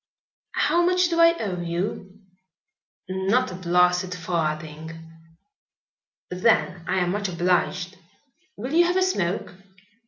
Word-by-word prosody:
"How 345 - +2
much 360 0 +3
do 335 -1 0
I 335 0 +6
owe 190 - -3
you?" 190 +3 -4 0.9
"Not 190 +5 0
a - - -7
blasted 180 0 +1
farthing." 160 -2 -4 1.3
"Then 180 -2 +1
I 190 - 0
am 180 -1 +1
much 200 +1 -2
obliged. 180 +1 0 0.6
Will 255 +7 -5
you 345 +1 +5
have 355 +1 +1
a 375 - +3
smoke?" 190 - -1
185 Hz, 120 wpm, -24 LUFS, 175-230 Hz, 1.3 s, I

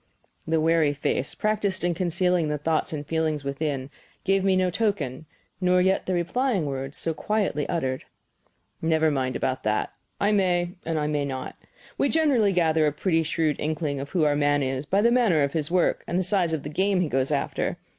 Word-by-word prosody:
The 160 0 +2
wary 160 -2 +3
face, 140 -1 -2
practised 210 -3 -1
in 175 0 +1
concealing 180 -1 +1
the 150 0 -1
thoughts 155 +2 -1
and 150 -2 -4
feelings 155 -2 -1
within, 140 -1 -3 0.3
gave 195 0 +2
me 190 -1 +3
no 185 -1 +2
token, 175 - -2 0.3
nor 180 0 +3
yet 190 +1 +1
the 185 - 0
replying 195 - 0
words, 135 0 -4
so 165 - -2
quietly 195 -6 -1
uttered: 130 -7 -2 0.8
"Never 160 -1 +2
mind 130 -2 -1
about 130 0 -1
that. 110 0 -1 0.3
I 205 - +2
may, 180 -4 +1 0.2
and 165 -1 0
I 150 - 0
may 150 -1 0
not. 130 -2 -5 0.4
We 280 - +2
generally 275 -10 +3
gather 160 -4 +2
a - - +2
pretty 165 +2 +1
shrewd 160 -1 0
inkling 150 -2 -2
of 140 +1 -6
who 175 -4 +1
our 145 -1 +3
man 145 -1 +2
is 135 +2 -3
by 200 +4 +2
the 235 - +4
manner 220 - +3
of 140 - -1
his 155 -2 -1
work 180 0 +1
and 175 - -1
the 185 - +1
size 185 -3 +1
of 160 -3 -2
the 150 - -5
game 190 +4 +1
he 175 - +1
goes 130 -1 0
after. 145 -2 -1
160 Hz, 200 wpm, -25 LUFS, 145-185 Hz, 0.8 s, the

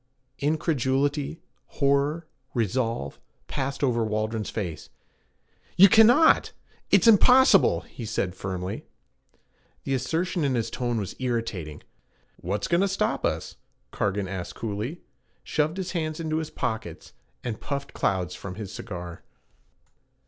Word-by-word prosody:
Incredulity, 145 0 0 0.4
horror, 140 +3 +2 0.3
resolve, 115 - -1 0.3
passed 135 +2 -3
over 120 -4 +2
Waldron's 110 0 -2
face. 85 -8 -5 0.9
'You 195 +2 +9
cannot! 240 - +6 0.4
It's - - +5
impossible!' 225 - +6
he 115 - -10
said 90 -3 -1
firmly. 95 0 -5 1.0
The 135 - -2
assertion 160 +7 -1
in 135 -3 +1
his 115 -2 -1
tone 120 -2 -1
was 95 -2 -5
irritating. 115 - -3 0.5
'What's 100 +3 -3
goin' 170 +1 +2
to 200 - +3
stop 195 0 -1
us?' - - -2 0.3
Cargan 100 -1 -1
asked 90 -1 -5
coolly; 115 +9 -4 0.4
shoved 155 +3 0
his 185 -1 -3
hands 155 -3 -2
into 160 -1 -1
his 160 -1 -3
pockets, 110 -7 -4 0.3
and 115 -3 -4
puffed 140 -1 -4
clouds 90 -2 0
from 90 0 -7
his 100 -2 -7
cigar. 90 -2 -7
125 Hz, 120 wpm, -26 LUFS, 100-155 Hz, 1.0 s, You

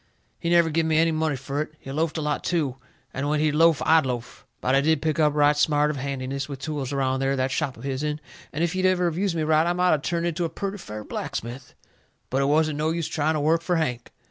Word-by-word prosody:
He 170 - -2
never 170 -1 +4
give 160 +1 +1
me 160 -1 +2
any 165 +1 +4
money 155 -2 0
fur 135 +2 -3
it. 155 0 -5
He 135 - -9
loafed 160 +3 -1
a 155 - -2
lot 150 0 -1
too, 150 -7 -1 0.4
and 140 +2 -2
when 150 0 +1
he'd 155 0 +2
loaf 165 -1 +4
I'd 160 0 +5
loaf. 120 -2 -5
But 130 - 0
I 135 - +5
did 160 +1 +2
pick 155 +1 -1
up 150 -1 +3
right 150 0 +4
smart 150 0 +2
of 150 - -6
handiness 135 0 -4
with 140 - -5
tools 140 -1 -4
around 135 -1 0
that 135 +1 +1
there 130 0 0
shop 140 -1 -2
of 115 - -12
his'n, 145 +2 -2 0.3
and 155 +3 -2
if 170 +1 0
he'd 185 0 +2
ever 180 -1 +2
of 170 -2 0
used 190 -1 0
me 160 - 0
right 155 +1 +3
I 175 - +2
might 180 -1 +3
of 150 - 0
turned 170 +2 -1
into 170 +1 -1
a 165 - -1
purty 200 +4 -5
fair 105 -9 -7
blacksmith. 120 +4 -6 0.6
But 135 +2 +1
it - - +2
wasn't 150 +1 +2
no 155 +1 +1
use 165 -1 -1
trying 155 0 0
to - - 0
work 160 +3 +2
fur 175 +1 0
Hank. 125 -7 -2
150 Hz, 265 wpm, -25 LUFS, 140-165 Hz, 0.6 s, I'd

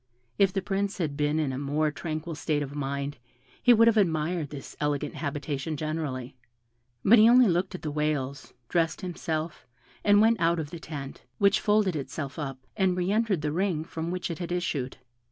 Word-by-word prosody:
If 195 -1 +5
the 195 0 -2
Prince 200 0 -1
had 155 -6 -2
been 150 +1 +1
in 150 -4 0
a 130 - -3
more 150 +2 0
tranquil 155 +2 -4
state 150 -1 -1
of 140 0 -7
mind 140 -1 -3 0.4
he 245 - +6
would 230 -1 +7
have 225 -1 +4
admired 165 -4 +1
this 140 -2 -9
elegant 150 0 -1
habitation 145 0 -3
generally; 145 -5 -3 0.7
but 230 +3 +8
he 220 +2 +8
only 250 0 +7
looked 185 +1 0
at - - -8
the 155 - -2
whales, 145 -2 -2 0.2
dressed 165 - 0
himself, 165 -3 -4 0.4
and 205 0 +5
went 225 +1 +4
out 170 0 +3
of 150 -2 -4
the 170 - -7
tent, 140 -4 -7 0.2
which 200 -1 +4
folded 210 -4 +2
itself 140 +1 -5
up, 135 -3 -4 0.2
and 190 -3 +2
re 180 +1 0
entered 215 -6 +1
the 150 - 0
ring 175 -2 0
from 165 0 -5
which 180 0 -3
it 165 - -5
had 175 -1 -4
issued. 150 -7 -2
160 Hz, 190 wpm, -27 LUFS, 145-185 Hz, 0.7 s, but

